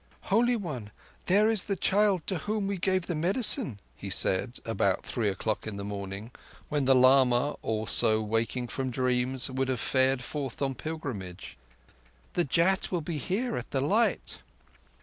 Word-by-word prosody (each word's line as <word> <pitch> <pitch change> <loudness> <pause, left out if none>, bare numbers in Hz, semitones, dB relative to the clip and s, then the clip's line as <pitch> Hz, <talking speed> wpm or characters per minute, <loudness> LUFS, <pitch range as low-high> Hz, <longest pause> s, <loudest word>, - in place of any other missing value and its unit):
"Holy 240 +3 +4
One, 150 - -5 0.4
there 205 +4 +4
is 220 -4 +2
the 200 - -1
child 195 -1 +2
to 185 -4 -2
whom 210 +3 -2
we 200 0 -1
gave 185 0 0
the - - -3
medicine," 185 - +2 0.2
he 100 - -8
said, 95 +5 +2
about 100 -4 0
three 110 -4 -1
o'clock 105 +3 -3
in 105 -2 -5
the 100 - -5
morning, 100 +2 -6 0.4
when 145 -2 0
the 135 0 +5
lama, 130 +1 +4
also 110 0 +2
waking 115 +3 -1
from 130 +1 -3
dreams, 125 +1 0
would 130 0 -1
have 130 -3 -1
fared 130 +1 +1
forth 135 -3 -5
on 135 -1 -1
pilgrimage. 130 - -6 0.8
"The 175 - +2
Jat 170 +7 +2
will 175 -3 0
be 155 -1 -4
here 225 - -2
at 120 - -6
the 135 - -1
light." 205 - +1
135 Hz, 165 wpm, -28 LUFS, 115-185 Hz, 0.8 s, the